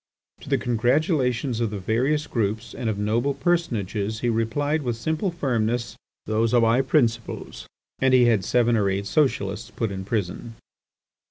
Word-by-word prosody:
To -, -, -11 dB
the -, -, +3 dB
congratulations 125 Hz, -, +1 dB
of 115 Hz, -2 st, 0 dB
the 105 Hz, -, -5 dB
various 130 Hz, +10 st, 0 dB
groups 110 Hz, -3 st, -2 dB
and 115 Hz, -, -3 dB
of 105 Hz, -, -2 dB
notable 115 Hz, +7 st, 0 dB
personages, 110 Hz, -, -1 dB
he 120 Hz, -, +1 dB
replied 145 Hz, +7 st, 0 dB
with 120 Hz, -4 st, -2 dB
simple 160 Hz, -, -1 dB
firmness: 120 Hz, -7 st, -1 dB, 0.3 s
"Those 110 Hz, +2 st, +1 dB
are 120 Hz, -, +5 dB
my 115 Hz, +3 st, +4 dB
principles!" 120 Hz, -4 st, -1 dB, 0.3 s
and 130 Hz, 0 st, +3 dB
he 125 Hz, -1 st, +6 dB
had 110 Hz, -5 st, +3 dB
seven 120 Hz, +2 st, +2 dB
or 100 Hz, -3 st, +2 dB
eight 95 Hz, +1 st, -2 dB
Socialists 115 Hz, -5 st, 0 dB
put 115 Hz, -3 st, -3 dB
in 95 Hz, -1 st, -5 dB
prison. 105 Hz, +2 st, -3 dB
115 Hz, 160 wpm, -24 LUFS, 110-130 Hz, 0.3 s, he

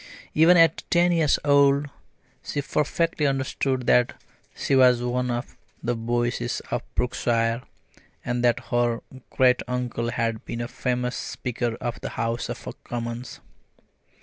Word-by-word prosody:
Even 165 Hz, +3 st, +6 dB
at 165 Hz, -1 st, +5 dB
ten 175 Hz, 0 st, +4 dB
years 160 Hz, -4 st, +3 dB
old 140 Hz, 0 st, +4 dB, 0.6 s
she 145 Hz, -, -3 dB
perfectly 150 Hz, +1 st, 0 dB
understood 130 Hz, -1 st, -1 dB
that 125 Hz, 0 st, +3 dB, 0.4 s
she -, -, -1 dB
was 125 Hz, -2 st, +5 dB
one 125 Hz, +1 st, -1 dB
of 120 Hz, +2 st, -4 dB, 0.3 s
the 120 Hz, 0 st, 0 dB
Boyces 120 Hz, -, -1 dB
of -, -, 0 dB
Brookshire, 115 Hz, -1 st, 0 dB, 0.6 s
and 120 Hz, 0 st, -1 dB
that 120 Hz, -1 st, +3 dB
her 120 Hz, -1 st, +1 dB, 0.3 s
great 125 Hz, -1 st, +3 dB
uncle 125 Hz, -2 st, -2 dB
had 115 Hz, -1 st, -2 dB
been 120 Hz, -, -5 dB
a 120 Hz, -, -3 dB
famous 125 Hz, 0 st, -2 dB
Speaker 120 Hz, -1 st, -3 dB
of 120 Hz, -1 st, -4 dB
the -, -, -4 dB
House 115 Hz, +1 st, -2 dB
of -, -, -6 dB, 0.2 s
Commons. 120 Hz, +1 st, -5 dB
125 Hz, 135 wpm, -25 LUFS, 120-140 Hz, 0.6 s, Even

